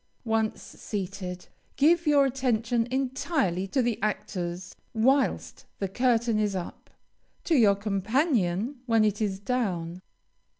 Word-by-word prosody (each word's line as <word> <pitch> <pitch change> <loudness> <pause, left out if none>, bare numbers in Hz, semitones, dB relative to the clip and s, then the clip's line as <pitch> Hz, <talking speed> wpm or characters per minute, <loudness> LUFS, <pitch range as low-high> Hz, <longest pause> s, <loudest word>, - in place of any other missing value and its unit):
Once 220 -1 0
seated, 185 -3 -6 0.3
give 330 +4 +3
your 285 -2 +5
attention 240 -3 0
entirely 260 - -1
to 260 +6 +1
the 235 -2 -1
actors 180 -4 -3 0.2
whilst 265 +5 +1
the 195 - -2
curtain 235 +1 +1
is 205 -2 0
up 180 -2 -7 0.5
to 335 - 0
your 210 -7 +5
companion 215 - 0
when 225 -2 +4
it 210 0 0
is 200 -3 0
down. 185 -7 -2
220 Hz, 120 wpm, -27 LUFS, 195-255 Hz, 0.5 s, your